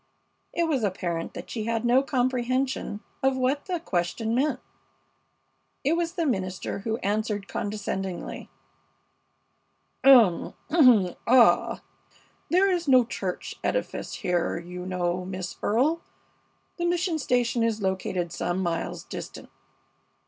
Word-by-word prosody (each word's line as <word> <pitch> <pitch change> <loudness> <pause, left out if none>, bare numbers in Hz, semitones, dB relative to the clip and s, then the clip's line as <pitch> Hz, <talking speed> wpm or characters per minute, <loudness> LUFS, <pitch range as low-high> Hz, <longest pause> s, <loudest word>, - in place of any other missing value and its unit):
It 340 - 0
was 305 -6 +1
apparent 175 -4 -2
that - - -7
she 220 -3 -3
had 230 0 -1
no 245 +2 +5
comprehension 255 -3 -1 0.2
of 265 0 +2
what 260 +3 0
the 360 -3 -2
question 220 - -1
meant. 260 +1 +1 1.2
It 290 - +2
was 335 0 -1
the 340 -3 -1
minister 190 - -2
who 225 +2 -2
answered, 205 0 -1
condescendingly: 195 -3 -4 1.5
"Um! 235 -10 +6 0.7
Ah! 245 0 +5 0.7
There 380 +3 +4
is 350 -3 -1
no 255 -3 +6
church 190 -5 -4
edifice - - -2
here, 175 -1 0
you 180 +1 -7
know, 180 -1 -1
Miss 185 -1 -5
Earle. 280 +10 +2 0.8
The 345 - -1
mission 345 -1 0
station 245 -3 +1
is 225 -1 +1
located 185 -3 -2
some 175 +1 -2
miles 170 -3 -2
distant." - - -8
230 Hz, 120 wpm, -26 LUFS, 185-270 Hz, 1.5 s, Um